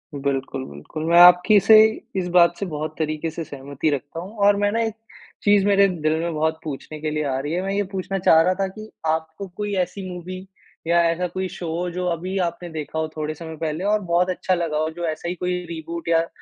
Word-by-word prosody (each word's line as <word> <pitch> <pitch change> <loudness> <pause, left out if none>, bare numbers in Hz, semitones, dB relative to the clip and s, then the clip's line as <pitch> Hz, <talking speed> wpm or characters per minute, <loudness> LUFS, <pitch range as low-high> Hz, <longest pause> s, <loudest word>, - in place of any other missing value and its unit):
बिल्कुल, 135 -1 -2
बिल्कुल, 70 - -8
मैं 170 +1 +5
आपकी 180 +4 +7
से 220 +4 +6 0.4
इस 180 - -2
बात 170 0 +6
से 200 - -3
बहुत 155 -2 -5
तरीके 155 +1 -2
से 165 +1 -5
सहमति 140 +1 -3
रखता 145 +3 -3
हूँ, 195 +6 -9
और 205 0 +5
मैं 205 0 +1
ना 230 - 0
एक 220 -2 -2 0.5
चीज़ 205 -1 +4
मेरे 200 -1 +5
दिल 155 -4 -1
में 170 0 -2
बहुत 160 +1 0
पूछने 155 +1 -7
के 155 -1 -2
लिए 150 0 -1
आ 135 -2 -1
रही 145 +3 -3
है। 180 - 0
मैं 195 +1 -2
ये 205 0 +1
पूछना 195 0 -3
चाह 160 -3 +6
रहा 180 +3 +3
था 195 - +1
कि 215 +3 -10 0.2
आपको 160 +4 -2
कोई 205 -1 -3
ऐसी 190 +1 -7
मूवी 180 +1 -7 0.5
या 170 0 +4
ऐसा 180 +2 -2
कोई 185 +1 -3
शो 180 -2 -7
हो, 180 +1 -2
जो 180 +1 -3
अभी 180 +3 -3
आपने 170 +1 -10
देखा 160 0 -5
हो 160 - -1
थोड़े 155 0 -2
समय 160 0 -8
पहले 160 +2 -3
और 210 +1 +2
बहुत 180 -1 +1
अच्छा 185 0 0
लगा 165 -3 -2
हो, 155 +1 0
जो 170 +1 -5
ऐसा 155 +2 -4
ही 180 - -3
कोई 180 +1 -2
रीबूट 165 0 -6
या 165 0 +3
170 Hz, 235 wpm, -22 LUFS, 155-185 Hz, 0.5 s, आपकी